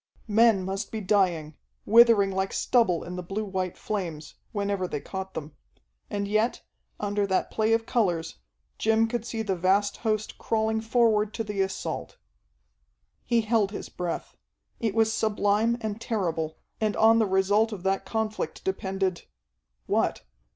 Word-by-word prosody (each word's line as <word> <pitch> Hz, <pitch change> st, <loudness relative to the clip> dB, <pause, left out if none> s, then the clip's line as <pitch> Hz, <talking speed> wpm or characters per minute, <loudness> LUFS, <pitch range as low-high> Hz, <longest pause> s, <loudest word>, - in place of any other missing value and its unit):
Men 220 Hz, -2 st, +4 dB
must 195 Hz, +2 st, -4 dB
be 220 Hz, -, -3 dB
dying, 180 Hz, -6 st, +1 dB, 0.3 s
withering 225 Hz, -3 st, +6 dB
like 190 Hz, 0 st, -1 dB
stubble 205 Hz, -9 st, +2 dB
in 180 Hz, +1 st, -6 dB
the -, -, -3 dB
blue 195 Hz, +5 st, -4 dB
white 185 Hz, -2 st, -3 dB
flames, 170 Hz, -8 st, -4 dB, 0.2 s
whenever 200 Hz, -3 st, -1 dB
they 150 Hz, -, -3 dB
caught 190 Hz, +4 st, -6 dB
them. 155 Hz, -1 st, -6 dB, 0.5 s
And 200 Hz, 0 st, -2 dB
yet, 215 Hz, +3 st, 0 dB, 0.4 s
under 205 Hz, 0 st, 0 dB
that 190 Hz, -1 st, 0 dB
play 220 Hz, 0 st, +1 dB
of 225 Hz, 0 st, +1 dB
colors, 175 Hz, -, 0 dB, 0.4 s
Jim 225 Hz, +1 st, +3 dB
could 235 Hz, 0 st, -3 dB
see 225 Hz, -1 st, -3 dB
the 195 Hz, -3 st, -1 dB
vast 195 Hz, +3 st, +2 dB
host 215 Hz, -2 st, -2 dB
crawling 220 Hz, 0 st, 0 dB
forward 220 Hz, -2 st, +2 dB
to 225 Hz, -, -2 dB
the 210 Hz, -2 st, -2 dB
assault. 190 Hz, 0 st, -3 dB, 1.1 s
He 235 Hz, -1 st, +3 dB
held 215 Hz, -2 st, +2 dB
his 205 Hz, -, -7 dB
breath. 175 Hz, -2 st, -4 dB, 0.4 s
It 220 Hz, -3 st, -1 dB
was 220 Hz, -1 st, +3 dB
sublime 215 Hz, +1 st, +1 dB
and 220 Hz, 0 st, -4 dB
terrible, 165 Hz, -9 st, -2 dB, 0.2 s
and 215 Hz, -1 st, +1 dB
on 225 Hz, +1 st, +5 dB
the 220 Hz, -, +3 dB
result 200 Hz, +4 st, +2 dB
of 195 Hz, -4 st, -6 dB
that 195 Hz, 0 st, 0 dB
conflict 215 Hz, -7 st, -3 dB
depended 190 Hz, -1 st, -2 dB, 0.6 s
what? -, -, 0 dB
205 Hz, 150 wpm, -27 LUFS, 190-220 Hz, 1.1 s, withering